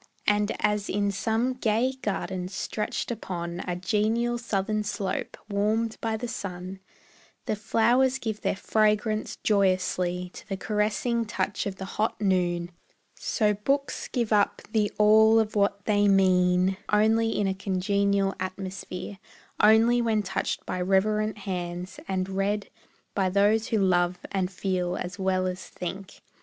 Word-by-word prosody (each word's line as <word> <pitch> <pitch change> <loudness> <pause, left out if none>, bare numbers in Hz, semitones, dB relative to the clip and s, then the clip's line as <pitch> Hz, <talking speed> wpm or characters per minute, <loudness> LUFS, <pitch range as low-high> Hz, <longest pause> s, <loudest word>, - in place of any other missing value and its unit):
And 205 0 +2
as 210 -1 0
in 200 0 +1
some 225 +5 0
gay 240 +1 +1
garden 190 -3 -2
stretched 210 +4 -3
upon 175 -6 -4
A 180 - -1
genial 225 +5 0
southern 215 -1 -1
slope, 200 -2 -3
warmed 215 +2 0
by 225 -1 -1
the 245 +2 -4
sun, 185 -3 -6 0.7
The - - 0
flowers 240 +5 +2
give 220 -5 -4
their - - 0
fragrance 215 +1 +1
joyously 185 -3 +1
To - - -12
the 195 - -2
caressing 215 +3 0
touch 205 -1 -2
of 195 - -4
the 190 - -6
hot 215 +3 -2
noon; 175 -3 0 0.4
So 210 -3 +1
books 275 +8 -1
give 235 -4 -1
up 205 -1 +2
the 215 -2 +1
all 220 +1 +6
of 215 -1 -1
what 200 -1 +1
they 205 -1 +3
mean 185 -1 +3
Only 225 +2 +3
in 205 - +1
a 190 - +1
congenial 195 +1 +1
atmosphere, 185 0 -6 0.4
Only 225 +3 +5
when 220 -2 +1
touched 195 - -2
by 180 - -3
reverent 210 +3 +1
hands, 180 -2 -5
and 185 -1 -1
read 195 +2 -1 0.4
By 190 -2 +1
those 205 +3 +3
who 225 - +1
love 180 -2 +2
and 190 -2 0
feel 180 -1 -1
as 180 +2 -5
well 190 -1 +1
as 185 0 -3
think. 185 +2 -7
200 Hz, 145 wpm, -27 LUFS, 185-215 Hz, 0.7 s, all